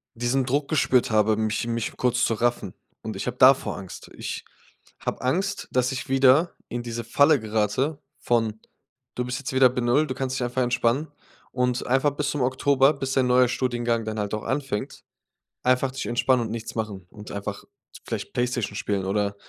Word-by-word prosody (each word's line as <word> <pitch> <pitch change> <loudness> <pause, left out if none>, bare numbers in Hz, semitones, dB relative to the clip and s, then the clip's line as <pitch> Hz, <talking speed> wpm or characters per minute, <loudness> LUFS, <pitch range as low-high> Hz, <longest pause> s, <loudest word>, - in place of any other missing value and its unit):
diesen 120 +3 0
Druck 140 +3 0
gespürt 130 -6 +2
habe, 110 0 +3
mich 110 +1 -1
mich 115 -1 -3
kurz 125 0 +1
zu 115 - +1
raffen. 115 -4 -1 0.3
Und 110 -2 -6
ich 95 - -4
habe 125 0 -4
davor 130 +1 +5
Angst. 95 -2 -10
Ich - - -5 0.6
habe - - -4
Angst, 190 +10 -1
dass 125 0 +2
ich 135 +1 -5
wieder 135 +5 +4
in 120 0 -4
diese 120 0 -4
Falle 140 +5 +4
gerate 110 +7 0 0.2
von: 115 -2 0 0.5
„Du 125 - -2
bist 125 +1 -3
jetzt 140 -1 -5
wieder 130 -1 +6
bei 125 - -2
0 125 +6 +2
du 130 - -3
kannst 130 0 -3
dich 125 - -1
einfach 125 +2 -2
entspannen. 125 +4 +1 0.4
Und 125 -1 -1
einfach 135 +3 +3
bis 145 0 -2
zum 145 - -2
Oktober, 135 +2 +3
bis 135 -2 -4
dein 130 -1 +3
neuer 125 0 +4
Studiengang 120 -2 -1
dann 110 0 -4
halt 105 0 -2
auch 105 - -3
anfängt, 135 -6 -3 0.6
einfach 130 +1 +2
dich 135 - -5
entspannen 120 0 +2
und 110 - -5
nichts 115 0 -6
machen 105 -5 -4
und 105 0 -11
einfach 100 0 -5 0.4
vielleicht - - -5
Playstation 120 -4 -1
spielen 100 -2 -2
oder 100 +1 0
125 Hz, 190 wpm, -25 LUFS, 110-130 Hz, 0.6 s, wieder